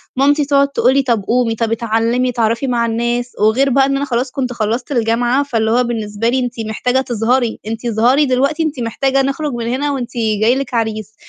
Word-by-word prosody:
مامتي 285 +2 +2
تقعد 280 0 +3
تقول 260 -2 +2
لي 275 - +3
طَب 230 -6 0
قومي 235 +1 +1
طَب 230 0 -2
اتعلمي 230 +2 0
اتعرّفي 230 +2 0
مع 235 -2 +1
الناس، 240 +2 -1
وغير 225 +6 +3
بقى 270 +1 +3
إن 275 0 0
أنا 280 - -2
خلاص 250 0 -2
كنت 255 -3 -3
خلّصت 235 +4 -2
الجامعة 240 +2 +1
فاللي 225 -5 -1
هو 245 +2 +3
بالنسبة 225 -1 -2
لي 260 - +1
أنتِ 245 -1 -2 0.2
محتاجة 250 +4 0
تظهري، 240 -1 0
أنتِ 225 +2 -5
اظهري 240 +6 +3
دلوقتي 280 +5 +1
أنتِ 300 -4 -3
محتاجة 270 +4 0
نخرج 275 +1 -2
من 235 -1 -4
هنا 275 +4 -1
وأنتِ 255 -3 -4 0.3
جاي 230 +3 +4
لِك 270 -2 -4
عريس. 220 -2 -2
245 Hz, 200 wpm, -16 LUFS, 230-270 Hz, 0.3 s, جاي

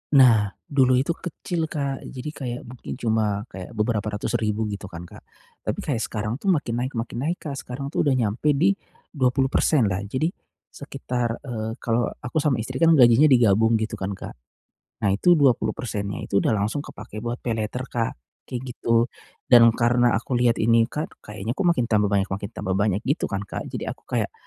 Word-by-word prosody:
Nah, 115 -6 +6 0.2
dulu 130 -3 +3
itu 135 +6 +1
kecil, 165 -1 -3
Kak, 140 -3 -3
Jadi 130 +3 -6
kayak 125 -5 -5
mungkin 125 0 -8
cuma, 110 -4 0
kayak 95 +5 -9
beberapa 105 -1 0
ratus - - -1
ribu 110 0 0
gitu, 100 -1 -6
kan, 85 -1 -8
Kak. 85 - -12 0.5
Tapi - - -1
kayak 130 -7 -1
sekarang 110 +3 -3
itu 200 - -6
makin 150 -10 +1
naik 130 +2 -2
makin 115 +1 -4
naik, 175 - -1
Kak. 140 -3 -4
Sekarang, 135 +3 -6
tuh, 150 - +1
udah 135 - +3
nyampe 125 +6 +1
di 175 +8 +4 0.4
20% 135 0 +2
lah. 95 -2 0
Jadi, 155 - 0 0.4
sekitar, 125 -4 -3
eee, 115 -3 -4
kalo 115 0 +1 0.2
aku 125 +6 -1
sama 145 -3 +2
istri, 130 +3 -5
kan, 165 -1 +6
gajinya 125 +3 +7
digabung 115 -3 +4
gitu, 110 0 -2
kan, 95 0 -3
Kak. - - -8 0.7
Nah, - - +4
itu 175 - +4
20%-nya 110 -6 0
itu 100 - +1
udah - - +1
langsung 110 +8 -1
kepake 110 -4 -9
buat 120 +1 -3
paylater, 115 +2 -3
Kak, 115 -3 -1 0.4
kayak 125 -1 -3
gitu. 115 0 +2 0.4
Dan 115 -2 +8
karena 120 -2 +3
aku 125 +3 -5
lihat 120 -1 +3
ini, 115 +1 +3
Kak, 150 +1 -5
kayaknya, 105 +2 -5
kok, 190 +4 -2
makin 125 -8 +2
tambah 105 -2 +2
banyak 100 -1 +2
makin 100 +1 -4
tambah 95 0 -3
banyak 100 +1 0
gitu, 140 +5 0
kan, 100 +1 -3
Kak. - - -6
Jadi - - -5
aku - - -6
kayak, - - -1
120 Hz, 190 wpm, -24 LUFS, 105-135 Hz, 0.7 s, Dan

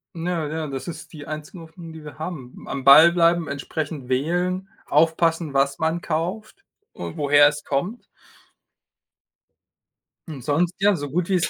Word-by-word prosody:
Ja, 165 -2 -2
ja. 155 0 -4
Das 135 0 -6
ist 170 - -8
die 145 -2 -9
einzige 155 +4 -7
Hoffnung, 165 +1 -11
die 160 -1 -11
wir 150 0 -11
haben. 155 -7 -7
Am 135 - -4
Ball 155 +5 +9
bleiben, 170 -1 +2
entsprechend 140 -1 -5
wählen, 175 +8 -1 0.2
aufpassen, 165 -2 +2
was 140 0 +1
man 160 +2 0
kauft 190 - -4 0.3
und 160 - -7
woher 145 0 +6
es 150 0 -2
kommt. 175 - -3 2.2
Und 150 -5 -8
sonst, 165 +7 0
ja, 200 0 +4
so 145 -3 -5
gut 170 +4 -1
wie 195 - -1
es 175 - +1
160 Hz, 155 wpm, -23 LUFS, 145-175 Hz, 2.2 s, Ball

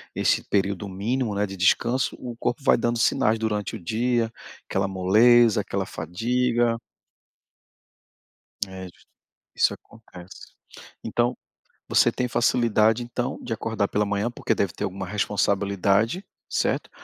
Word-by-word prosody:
esse - - +2
período 100 0 0
mínimo, 110 +3 -2
né, 105 +1 +1
de 95 0 -8
descanso, 120 +7 +1
o 120 -2 -7
corpo 120 +3 -3
vai - - +5
dando 120 0 0
sinais 115 -1 +2
durante 110 0 -2
o - - -7
dia, 115 +2 0 0.4
aquela 95 0 0
moleza, 105 +4 +4
aquela 95 -1 -3
fadiga. 115 +6 0 1.9
É 95 0 -8
jus 85 - -19 0.5
isso - - +3
acontece. 95 -5 -14 0.5
Então, 120 +2 0 0.5
você - - +4
tem 125 0 -2
facilidade 115 -1 +2
então 120 0 -3
de 115 - -5
acordar 110 -2 -1
pela 105 0 +1
manhã, 100 +4 -1
porque - - -1
deve 95 -4 -1
ter - - -5
alguma 95 0 -4
responsabilidade, 100 - 0 0.2
certo? - - -1
110 Hz, 130 wpm, -24 LUFS, 100-120 Hz, 1.9 s, vai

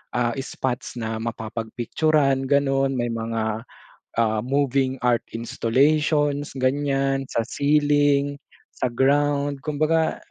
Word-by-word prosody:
ah, 120 -1 +1
spots 130 -2 -4
na 110 -2 -3
mapapag-picturan, 120 +5 0
ganun. 135 -1 +2
May 120 -1 -1
mga, 115 0 -3 0.5
ah, 110 -1 +1
moving 135 -1 0
art 120 -1 +1
installations, 145 +5 +1
ganiyan, 135 0 0
sa - - +2
ceiling, 145 +2 +2 0.4
sa 125 - -1
ground. 140 +2 +2
Kumbaga, 155 +2 +1
135 Hz, 100 wpm, -23 LUFS, 120-145 Hz, 0.5 s, ganun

